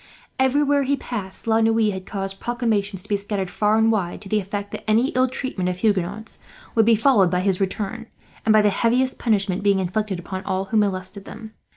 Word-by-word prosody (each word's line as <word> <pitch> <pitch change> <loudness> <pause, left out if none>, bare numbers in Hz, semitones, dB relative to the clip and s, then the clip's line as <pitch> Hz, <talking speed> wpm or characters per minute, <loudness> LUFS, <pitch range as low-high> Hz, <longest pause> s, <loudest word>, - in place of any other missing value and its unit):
Everywhere 285 +2 +3
he 280 +1 0
passed 205 -8 -6
La 225 0 +3
Noue 225 -1 +3
had 190 -1 -7
caused 195 -1 -4
proclamations 215 -6 -1
to - - -15
be 210 - +1
scattered 200 -2 -3
far 210 +1 +2
and 225 0 +4
wide, 190 -6 -1
to 200 - -9
the 215 - +2
effect 200 +1 -5
that - - -6
any 230 +5 +3
ill 255 +1 +2
treatment 250 -8 -3
of 180 - -3
Huguenots 205 +1 -1 0.3
would 225 -2 +4
be 230 - +6
followed 215 -5 +4
by 180 +1 0
his 190 0 0
return, 210 +4 -3 0.4
and 220 - +3
by 215 -1 +5
the 205 - +4
heaviest 250 +5 +1
punishment 200 -5 +1
being 200 -1 +3
inflicted 190 +1 -1
upon 185 +2 -6
all 190 0 -2
who 220 +3 -1
molested 195 -1 -1
them. 220 0 -10
210 Hz, 210 wpm, -22 LUFS, 195-225 Hz, 0.4 s, be